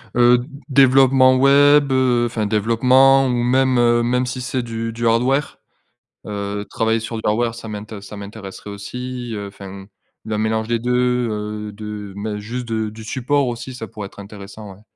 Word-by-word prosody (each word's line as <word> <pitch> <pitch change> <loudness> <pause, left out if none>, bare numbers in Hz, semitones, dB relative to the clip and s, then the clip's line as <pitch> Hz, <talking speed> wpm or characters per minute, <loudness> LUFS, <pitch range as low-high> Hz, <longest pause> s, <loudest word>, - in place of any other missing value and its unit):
Heu, 120 0 +5
d 125 - -8 0.2
développement 130 -1 +5
web, 140 +1 +5
heu, 125 -2 +2
enfin, 115 -2 -2
développement, 125 +6 +4
ou 125 - 0
même, 130 +1 +2
heu, 120 0 +3
même 125 +2 +1
si 125 +1 -5
c'est 125 +1 -2
du 115 -1 -4
du 115 +1 -4
hardware, 130 +5 +1 0.7
heu, 100 0 -4
travailler 115 0 0
sur 115 +1 -6
du - - -5
hardware 115 +2 +1
ça 115 -1 -9
m'intér 105 0 -7
ça 105 - -10
m'intéresserait 100 0 -9
aussi, 125 +4 -6
heu, 100 -1 -5
enfin, 100 -1 -10 0.4
le 110 -1 -2
mélange 110 +1 -1
des 115 0 0
2, 125 0 +1
heu, 105 0 -5
de 105 -1 -7
m 100 +1 -6
hein, 105 -1 -3
juste 120 +4 -5
de 110 -1 -2
du 110 +1 -11
support 130 +4 0
aussi, 120 +2 -5
ça 115 -3 -7
pourrait 105 0 -7
être 100 - -16
intéressant, 100 0 -10
ouais. 95 - -19
115 Hz, 185 wpm, -20 LUFS, 105-125 Hz, 0.7 s, Heu